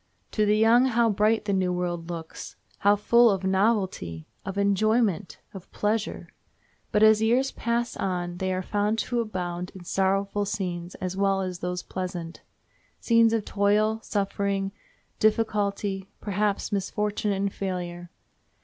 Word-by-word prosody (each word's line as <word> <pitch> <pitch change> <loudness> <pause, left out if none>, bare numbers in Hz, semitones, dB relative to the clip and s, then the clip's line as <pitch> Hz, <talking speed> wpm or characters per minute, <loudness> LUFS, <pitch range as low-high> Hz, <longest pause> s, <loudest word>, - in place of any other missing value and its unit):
To 215 -1 +1
the 210 +1 +4
young 230 +3 +5
how 235 -3 +3
bright 215 +2 +2
the 200 - 0
new 185 -1 +1
world 175 -1 -3
looks! 165 -2 -7 0.2
how 205 +1 +5
full 235 +3 +5
of 195 -2 0
novelty! 190 - 0 0.2
of 195 0 -5
enjoyment! 200 -1 +1 0.2
of 190 -2 -11
pleasure! 210 +1 -2 0.6
But 210 - +3
as 220 0 +6
years 245 +5 +2
pass 235 +1 -2
on 175 -2 -2
they 185 +1 -1
are 185 0 -2
found 210 +3 0
to 240 +2 -1
abound 180 -5 -3
in 185 - -10
sorrowful 195 +2 0
scenes 180 -3 -4
as 185 0 -4
well 195 0 +1
as 185 -2 -4
those 180 0 -3
pleasant—scenes 185 +5 -2
of 225 -2 0
toil, 210 +2 +2
suffering, 200 -1 -1 0.5
difficulty, 205 -3 0
perhaps 205 0 -1
misfortune 210 +1 -1
and 195 0 -1
failure. 175 -2 -4
200 Hz, 140 wpm, -26 LUFS, 185-215 Hz, 0.6 s, as